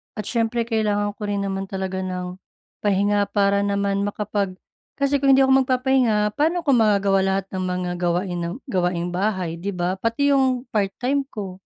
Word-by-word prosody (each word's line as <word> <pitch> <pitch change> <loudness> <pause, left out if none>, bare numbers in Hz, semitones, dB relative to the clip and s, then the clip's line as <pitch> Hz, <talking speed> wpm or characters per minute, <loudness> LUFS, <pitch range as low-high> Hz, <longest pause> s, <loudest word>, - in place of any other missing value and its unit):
At 215 - -4
siyempre 230 +2 0
kailangan 210 -3 0
ko 210 0 -6
rin 200 -1 -1
naman 195 0 -3
talaga 190 -1 -3
ng 180 -1 -5 0.4
pahinga 205 0 +2
para 200 0 +2
naman 200 0 0
makapag 205 -2 -2 0.4
kasi 280 0 +2
kung 275 0 +4
hindi - - +4
ako 265 0 +5
magpapahinga 250 -5 +2
pano 320 +5 +1
ko 315 -5 +1
magagawa 200 -4 +3
lahat 195 0 0
ng 185 - -2
mga 180 0 -2
gawain 175 +1 -1
ng 170 +2 -3
gawaing 180 -5 0
bahay 185 -4 -1
di 200 +4 -3
ba? 180 +1 -1
Pati 230 +7 +1
yung 260 -1 +1
part-time 245 +7 0
ko. 195 -7 -7
205 Hz, 170 wpm, -22 LUFS, 190-230 Hz, 0.4 s, ako